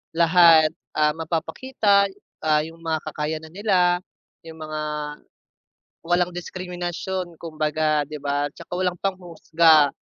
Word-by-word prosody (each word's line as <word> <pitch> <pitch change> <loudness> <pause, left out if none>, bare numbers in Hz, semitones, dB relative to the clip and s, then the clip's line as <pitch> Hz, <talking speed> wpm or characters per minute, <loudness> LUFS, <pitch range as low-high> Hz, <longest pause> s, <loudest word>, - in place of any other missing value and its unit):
lahat, 165 -2 +6 0.2
ah, 150 0 +3
mapapakita, 200 +6 0 0.3
ah, 155 -1 +2
'yong 165 +1 -10
mga 160 -1 -2
kakayanan 155 +1 -4
nila, 180 -3 +2 0.5
'yong 160 0 -11
mga 155 0 -5 1.3
walang 175 0 +2
diskriminasyon 180 0 -5
kumbaga, 155 -2 0
'di 155 - -8
ba, 145 0 -1
'tsaka - - -11
walang 180 -1 0
panghuhusga, 165 -5 +3
165 Hz, 105 wpm, -23 LUFS, 155-180 Hz, 1.3 s, lahat